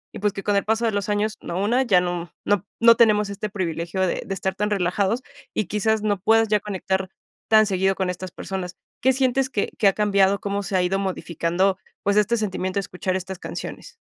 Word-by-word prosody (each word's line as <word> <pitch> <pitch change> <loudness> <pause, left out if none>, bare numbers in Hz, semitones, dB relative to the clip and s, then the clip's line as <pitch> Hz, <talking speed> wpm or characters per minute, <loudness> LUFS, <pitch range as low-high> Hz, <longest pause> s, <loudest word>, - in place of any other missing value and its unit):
Y - - -6
pues 210 0 +1
que 195 - -6
con 205 - +1
el 200 - +2
paso 225 +2 +1
de 225 - +2
los 205 0 -2
años, 210 +1 0
¿no?, 175 +1 -4
una 240 +6 +2
ya 195 -8 +4
no 175 -2 -3
no 205 -2 +1
no 230 0 +7
tenemos 210 -3 +4
este 200 +1 -4
privilegio 175 -2 -3
de - - -2
de 195 - -3
estar 190 0 -2
tan 210 +2 -1
relajados 200 +4 +1 0.3
y 215 - 0
quizás 210 +3 0
no 205 -2 +1
puedas 225 +3 +4
ya 210 0 +3
conectar 190 -2 -2 0.4
tan 215 -1 +6
seguido 190 -1 +2
con 190 -1 -1
estas 180 0 -5
personas. 180 -1 -5 0.3
¿Qué 265 +1 +5
sientes 260 0 +1
que 205 - -1
que 205 - +5
ha 195 - +5
cambiado? 200 -1 +3
¿Cómo 200 0 -2
se 190 0 -3
ha - - +3
ido 185 +2 +1
modificando, 185 0 0 0.3
pues, 200 +1 +2
este 210 +3 +3
sentimiento 190 -2 -2
a - - 0
escuchar 185 +1 -3
estas 190 0 -4
canciones? - - -7
200 Hz, 220 wpm, -23 LUFS, 185-215 Hz, 0.4 s, no